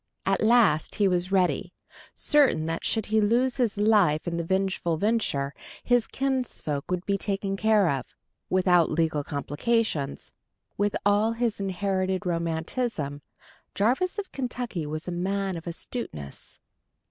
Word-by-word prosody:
At - - +1
last 215 -9 +4
he 205 -2 +3
was 180 0 +1
ready, 185 -2 +1 0.4
certain 275 - +3
that 165 0 -3
should 220 -2 0
he 220 - +5
lose 240 +5 +2
his 230 -5 0
life 205 -7 +3
in 170 0 -1
the 170 - -1
vengeful 190 -2 0
venture, 165 -9 0 0.3
his 245 -2 +2
kinsfolk 255 - -2
would 180 0 -2
be 200 -1 0
taken 195 0 -2
care 215 -2 +3
of, 135 -5 -1 0.4
without 180 -3 +4
legal 155 -2 0
complications: 145 - -1 0.4
with 205 0 0
all 205 +2 +3
his 230 -2 -1
inherited 190 0 -1
romanticism, 165 - -2 0.5
Jarvis 260 - +1
of 405 -2 -5
Kentucky 245 - -4
was 155 +3 -5
a - - -2
man 190 +2 -1
of 165 0 -8
astuteness. 165 - -6
195 Hz, 135 wpm, -26 LUFS, 165-225 Hz, 0.5 s, he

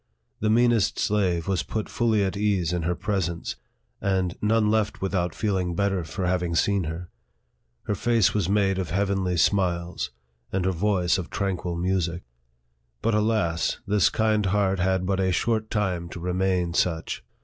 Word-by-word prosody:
The 110 - +1
mean 120 +2 +4
est 110 -4 +1
slave 95 -5 +1
was 95 -2 +1
put 110 -1 -3
fully 110 -3 +1
at 95 0 -1
ease 100 -5 +1
in 90 - 0
her 85 +2 0
presence, 90 -5 -2 0.5
and 95 -2 0
none 105 0 +3
left 110 -1 0
without 90 -3 -1
feeling 95 -5 -1
better 95 -1 0
for 80 +4 -4
having 90 -1 0
seen 100 +2 +2
her. 85 +3 -6 0.7
Her - - -1
face 115 0 +2
was 100 -4 0
made 100 -2 +2
of 90 - -3
heavenly 95 -1 0
smiles, 90 -3 +1 0.4
and 95 -1 -1
her 95 - +2
voice 95 0 +1
of 90 - -5
tranquil 90 -3 -2
music. 90 -1 -1 0.8
But, 115 - +2
alas! 105 -6 +1
this 100 -8 +3
kind 110 -2 +1
heart 95 -1 +1
had 95 0 +1
but 95 0 0
a 95 -1 +2
short 110 +3 0
time 90 -5 -1
to 90 - -8
remain 90 -1 0
such. 85 -2 -1
95 Hz, 165 wpm, -25 LUFS, 90-105 Hz, 0.8 s, mean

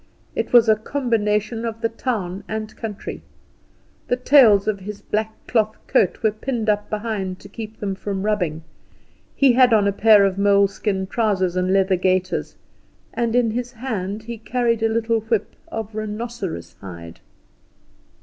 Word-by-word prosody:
It - - -2
was 240 -2 +6
a 220 - +6
combination 220 -3 -1
of 225 -1 -4
the 230 - +1
town 205 -6 -3
and 220 0 -5
country. 215 -3 -6 0.9
The - - +2
tails 250 -6 +5
of 210 -2 0
his 205 +2 -7
black 220 +1 -2
cloth 215 -2 0
coat 185 +4 +1
were 220 - +4
pinned 220 0 -3
up 205 0 -3
behind 210 -4 -3
to - - -11
keep 220 +1 -9
them 200 -2 -2
from 195 0 -4
rubbing; 175 -7 -1 0.7
he 275 -3 +5
had 250 -1 +5
on 205 -2 +4
a - - +3
pair 205 0 +6
of 195 0 -1
moleskin 200 -1 +2
trousers 190 -4 0
and 185 0 +1
leather 190 -1 +3
gaiters, 185 0 0 0.6
and 235 -1 -1
in 240 -2 +3
his 245 +2 -4
hand 215 -4 -4
he 235 0 -7
carried 235 0 0
a 225 - +2
little 225 0 +1
whip 220 -1 -2 0.2
of 220 -1 -5
rhinoceros 210 - -5
hide. 85 -2 -10
215 Hz, 160 wpm, -22 LUFS, 195-230 Hz, 0.9 s, was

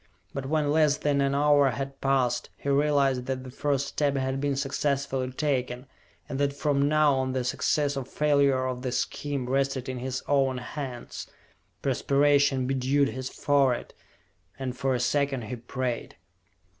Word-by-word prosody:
But 135 -1 -4
when 150 -1 +1
less 150 -1 +3
than 145 -2 +1
an 140 0 +1
hour 145 -1 +4
had 135 +2 -5
passed, 130 -3 +1
he 140 - -4
realized 140 -3 +2
that 130 -1 -2
the 130 - -9
first 140 +1 0
step 140 0 0
had 130 0 -1
been 140 -1 0
successfully 135 -1 -1
taken, 130 -3 -1 0.4
and 135 - -4
that 140 0 +1
from 140 -1 +1
now 155 -1 +4
on 130 -1 -1
the 130 -1 -1
success 145 +3 0
or 135 - -2
failure 140 -1 +2
of 130 -1 -3
the 130 -1 -2
scheme 140 0 -2
rested 135 0 0
in 130 -1 -4
his 130 +1 -4
own 135 -2 +2
hands. 125 -1 -6 0.6
Perspiration 140 0 +3
bedewed 135 +2 +1
his 130 0 -5
forehead, 135 -4 +1 0.6
and 130 -2 -4
for 130 0 0
a - - -1
second 140 0 0
he 110 +3 -5
prayed. 120 +1 -4
135 Hz, 160 wpm, -27 LUFS, 130-145 Hz, 0.6 s, hour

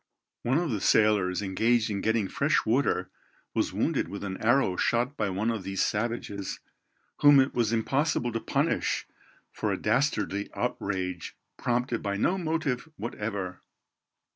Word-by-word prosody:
One 130 +4 +1
of 170 -4 0
the 105 -4 -2
sailors 105 -3 +3
engaged 110 +4 +2
in 100 -1 -2
getting 110 -2 +1
fresh 140 +9 +1
water 110 -6 +1 0.4
was - - 0
wounded - - 0
with 100 - -6
an 95 -1 -4
arrow 120 -4 +3
shot 120 +8 +1
by 105 -6 -1
one 100 +5 0
of 110 -3 -3
these 95 0 -1
savages, 105 -3 -3 0.6
whom 145 -1 +7
it 130 +1 +3
was 115 -3 +1
impossible 135 +3 +1
to 115 - -2
punish - - 0 0.5
for - - -2
a - - 0
dastardly 105 -7 0
outrage 90 -2 -3 0.2
prompted 120 -1 -1
by 100 -1 -2
no 185 - +1
motive 160 -4 -1
whatever. 100 -5 -4
110 Hz, 145 wpm, -28 LUFS, 100-125 Hz, 0.6 s, whom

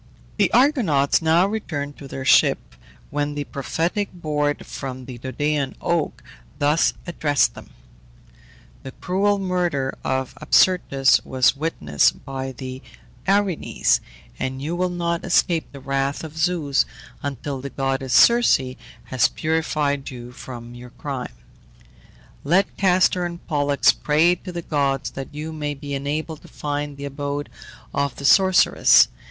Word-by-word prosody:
The - - +3
Argonauts 225 - +3
now 165 +3 +4
returned 155 -9 -4
to 140 - -9
their 135 0 -6
ship, - - +3 0.4
when 145 0 -2
the 145 - -2
prophetic 165 - -2
board 150 -4 -2
from 130 -2 -7
the 125 -2 -9
Dodonean 140 +2 -2
oak 170 -3 -1 0.3
thus 150 +3 +2
addressed 150 -5 +1
them: - - -12 1.1
"The 130 - -9
cruel 200 +3 0
murder 175 -8 -1
of 130 -1 -2
Absyrtus 140 -8 +4
was 130 0 +2
witnessed 75 - 0
by 135 -1 -4
the 130 +1 -8 0.5
Erinyes, 195 -3 +2 0.4
and 130 0 -3
you 155 +5 -3
will 180 +1 0
not 170 -1 -2
escape 170 -2 +1
the 140 - -10
wrath 135 +2 -2
of 160 -1 -8
Zeus 160 -4 +1 0.4
until 140 -1 -4
the 140 - -5
goddess 135 -1 -2
Circe 235 - +6 0.4
has 130 -3 +2
purified 150 -3 -1
you 120 -2 -9
from 120 -1 -9
your 120 0 -11
crime. 130 - -6 1.1
Let 180 +7 +2
Castor 185 -1 +3
and 170 0 -6
Pollux 145 -2 +3
pray 155 +4 +3
to 180 +1 -7
the 170 -1 -5
gods 140 -4 -1
that 135 0 -7
you 155 +2 -5
may 150 -1 -3
be 140 0 -7
enabled 150 +3 -3
to - - -15
find 145 -1 -4
the 140 - -6
abode 145 +1 -4 0.4
of 140 -2 -1
the 140 - -7
sorceress." 190 +4 +6
145 Hz, 135 wpm, -22 LUFS, 135-170 Hz, 1.1 s, Circe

